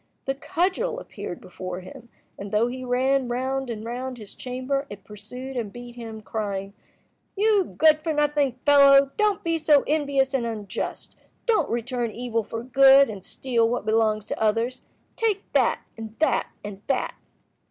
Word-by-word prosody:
The 270 - 0
cudgel 365 - -1
appeared - - -7
before 185 0 -7
him, 240 +4 -12 0.3
and 200 0 -7
though 215 +2 +3
he 255 +1 -4
ran 255 +1 +1
round 260 +2 -2
and 220 -1 -5
round 250 +2 -4
his 210 -3 -11
chamber, 260 +2 -3
it 205 -1 -10
pursued 220 +6 -8
and 225 -5 -3
beat 240 +1 -10
him, 225 -2 -8
crying— 200 -3 -4 0.6
"You 415 -2 +2
good 310 -1 +6
for 320 +1 -2
nothing 295 -3 +1
fellow! 280 -1 +7
Don't 420 -2 +1
be 330 -1 0
so 300 -2 +5
envious 280 -3 +1
and 265 -3 +1
unjust. 215 -5 -5 0.3
Don't 460 -3 +2
return 240 0 -2
evil 230 0 -2
for 225 +3 -6
good, 270 +1 +6
and 195 -3 -8
steal 235 -1 0
what 245 -2 -2
belongs 215 -1 +2
to - - -5
others. 230 +4 0 0.3
Take 425 -3 0
that, - - +3
and 225 -1 -8
that, 315 - +2 0.2
and 205 -1 -8
that!" 270 -2 0
250 Hz, 165 wpm, -25 LUFS, 225-280 Hz, 0.6 s, fellow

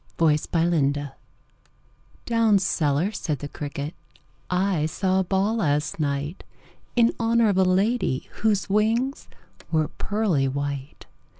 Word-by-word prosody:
The 165 - +3 0.3
Potato's 165 -4 +2
Dance 145 -1 -5 1.1
"Down 230 -3 +3
cellar," 165 -1 +1
said 155 -8 -3
the 145 - -6
cricket, 145 +1 -5 0.6
"I 180 -4 +1
saw 190 +3 0
a - - +2
ball 195 +4 0
last 150 -5 0
night 145 +2 -2 0.5
In 235 -1 +4
honor 230 -1 +3
of 195 - +1
a - - +6
lady 190 - +1
Whose 210 -2 +2
wings 225 +7 0 0.4
were 155 -2 +1
pearly 200 -10 0
white. 140 0 -4
180 Hz, 125 wpm, -24 LUFS, 145-210 Hz, 1.1 s, a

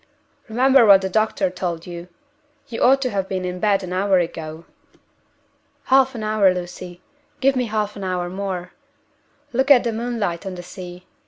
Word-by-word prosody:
Remember 260 +3 +4
what 200 -3 +7
the 190 - -1
doctor 215 -3 +1
told 175 -2 -4
you. 175 0 -8 0.6
You 230 - -5
ought 270 +2 +4
to 255 - -1
have 195 -1 -2
been 185 -1 -2
in 180 0 -4
bed 200 -1 +2
an 180 0 -5
hour 190 +1 +2
ago." 165 -2 -4 1.3
"Half 265 -1 +4
an 220 - -5
hour, 215 -3 +3
Lucy 180 0 -7 0.4
give 270 0 +3
me 250 -1 0
half 210 -2 -2
an 200 - -7
hour 180 -1 -2
more! 185 -1 -5 0.8
Look 265 +3 +1
at 270 -4 +7
the 235 -2 -1
moonlight 220 -7 -3
on 190 -2 -6
the 175 - -8
sea. 180 0 -10
195 Hz, 175 wpm, -21 LUFS, 180-225 Hz, 1.3 s, what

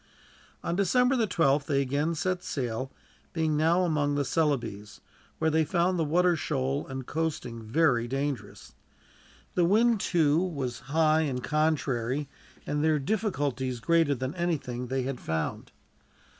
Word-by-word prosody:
On 170 - -1
December 250 +7 +3
the 230 -4 +1
12th 145 -6 +2
they 140 -2 +2
again 145 +5 0
set 185 +3 -1
sail, 130 -4 -3 0.4
being 160 -2 0
now 165 +4 +3
among 145 -4 +1
the 145 -1 0
Celebes, 125 -9 -1 0.4
where 160 0 +1
they 160 +1 +3
found 175 +3 +1
the - - +2
water 175 +3 +3
shoal 140 -3 -2
and 130 -1 -6
coasting 150 -8 -3
very 120 0 +2
dangerous. 135 +1 -4 0.8
The 180 - +2
wind, 220 +5 +4
too, 160 -5 +2
was 140 -9 -3
high 155 +1 +3
and 130 -5 -2
contrary, 145 -3 0 0.4
and 145 0 -1
their 155 -1 +3
difficulties 140 - -1
greater 165 0 +2
than 130 +2 -4
anything 145 -8 -2
they 130 +1 -1
had 130 -1 -4
found. 80 -1 -3
150 Hz, 145 wpm, -28 LUFS, 130-170 Hz, 0.8 s, wind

